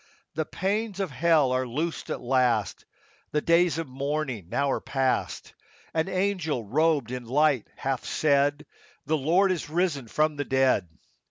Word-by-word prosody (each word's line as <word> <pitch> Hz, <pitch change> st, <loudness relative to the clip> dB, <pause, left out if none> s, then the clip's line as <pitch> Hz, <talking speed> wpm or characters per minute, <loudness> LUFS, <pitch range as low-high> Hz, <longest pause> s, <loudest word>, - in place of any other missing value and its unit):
The 160 Hz, 0 st, -2 dB
pains 205 Hz, +1 st, -2 dB
of 190 Hz, -6 st, -2 dB
hell 155 Hz, -2 st, +3 dB
are 130 Hz, 0 st, 0 dB
loosed 155 Hz, +7 st, -3 dB
at -, -, -3 dB
last; 125 Hz, -4 st, +1 dB, 0.5 s
The 150 Hz, -, +3 dB
days 170 Hz, 0 st, +3 dB
of 165 Hz, -2 st, -3 dB
mourning 135 Hz, -, -3 dB
now 140 Hz, +5 st, 0 dB
are -, -, -1 dB
past; 135 Hz, -2 st, -1 dB, 0.4 s
An 160 Hz, +1 st, 0 dB
angel 185 Hz, -, -1 dB
robed 145 Hz, +2 st, +1 dB
in 125 Hz, -1 st, -5 dB
light 140 Hz, -1 st, +2 dB
hath 135 Hz, -2 st, -2 dB
said, 145 Hz, 0 st, +1 dB
— -, -, -26 dB
" -, -, -34 dB
The 155 Hz, -, +1 dB
Lord 175 Hz, +7 st, +3 dB
is 170 Hz, -5 st, -3 dB
risen 160 Hz, -6 st, 0 dB
from 155 Hz, +5 st, 0 dB
the 145 Hz, -, -1 dB
dead." 130 Hz, -9 st, +2 dB
145 Hz, 165 wpm, -26 LUFS, 130-165 Hz, 0.5 s, hell